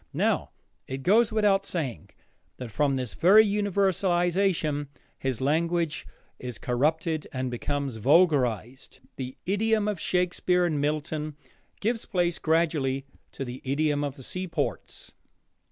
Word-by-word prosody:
Now - - +1 0.4
it 130 0 -5
goes 215 - +4
without 205 -3 +3
saying 140 - -4 0.5
that 125 -3 -7
from 140 +3 +1
this 125 -4 -3
very 210 +5 +6
universalization 190 -6 +1 0.3
his 130 -3 -2
language 165 +3 0 0.3
is 125 -2 -6
corrupted 155 +5 0
and 130 -1 -3
becomes 140 0 -3
vulgarized. 130 - +2 0.2
The 130 -1 -6
idiom 210 +2 +1
of 205 -5 -2
Shakespeare 180 0 +1
and 155 -4 0
Milton 150 0 -2 0.5
gives 225 +2 -1
place 175 -2 0
gradually 150 -5 +1 0.3
to 135 - -4
the 125 +1 -7
idiom 145 +2 0
of 140 -2 -3
the 135 - -11
seaports. 180 +4 -4
155 Hz, 120 wpm, -27 LUFS, 135-180 Hz, 0.5 s, very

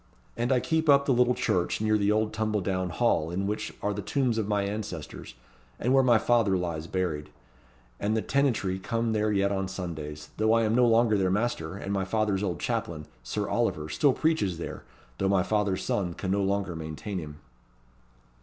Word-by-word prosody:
And 120 +2 -1
I 130 - +4
keep 160 +4 0
up 140 0 +6
the 135 - +3
little 125 0 +3
church 90 -1 0
near 110 0 +2
the 105 -1 +2
old 110 0 +1
tumble 110 -1 0
down 95 0 -1
hall, 85 -5 +1
in 95 +3 -2
which 105 +2 -3
are 105 - 0
the 105 - -4
tombs 125 +1 0
of 105 - -1
my 105 -1 +1
ancestors, 100 - -6 0.4
and 125 +3 +1
where 135 - +6
my 120 -3 +5
father 110 -4 +2
lies 85 -3 -3
buried; 85 -6 -2 0.7
and 105 +2 0
the 110 - -1
tenantry 120 -9 +1
come 115 +3 -1
there 105 0 +1
yet 100 -1 +2
on 95 -1 -1
Sundays, 80 -5 -6
though 110 +1 +3
I 115 0 +4
am 110 0 +1
no 125 0 +5
longer 115 -2 +4
their 95 -1 +2
master; 95 -4 -1
and 100 0 -4
my 95 -1 0
father's 105 0 0
old 90 -5 -2
chaplain, 80 -2 -3 0.2
Sir - - -3
Oliver, 75 0 -1
still 145 - +3
preaches 140 - 0
there, 85 - -6 0.4
though 95 - +1
my 95 -2 +3
father's 105 -2 0
son 90 -4 -1
can 95 - -3
no 100 +1 +2
longer 100 -2 -1
maintain 80 +5 -5
him." 75 -2 -8
100 Hz, 200 wpm, -28 LUFS, 90-115 Hz, 0.7 s, up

